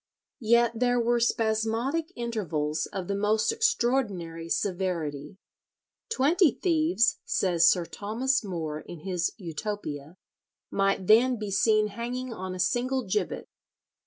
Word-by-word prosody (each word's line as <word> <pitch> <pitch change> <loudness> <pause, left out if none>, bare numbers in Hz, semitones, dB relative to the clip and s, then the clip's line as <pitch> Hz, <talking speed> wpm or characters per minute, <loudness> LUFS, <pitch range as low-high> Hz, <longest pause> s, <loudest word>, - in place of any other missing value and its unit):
Yet 235 0 +3
there 245 0 +2
were 240 0 +2
spasmodic 230 +8 0
intervals 165 -11 -2
of 190 -3 -6
the 200 - -1
most 210 +2 +1
extraordinary 235 - 0
severity. 170 -6 -2 0.7
Twenty 340 0 +3
thieves, 315 -8 +2
says 175 -3 +3
Sir 175 -2 +1
Thomas 225 - -1
More 160 -6 -4
in 165 0 -10
his 180 -1 -1
"Utopia," 170 -4 -6 0.5
might 195 -1 +1
then 240 +5 +5
be 210 -2 -5
seen 215 +1 +3
hanging 240 +3 -5
on 185 -3 -5
a - - -8
single 255 +5 0
gibbet. 420 - -2
215 Hz, 120 wpm, -27 LUFS, 180-245 Hz, 0.7 s, then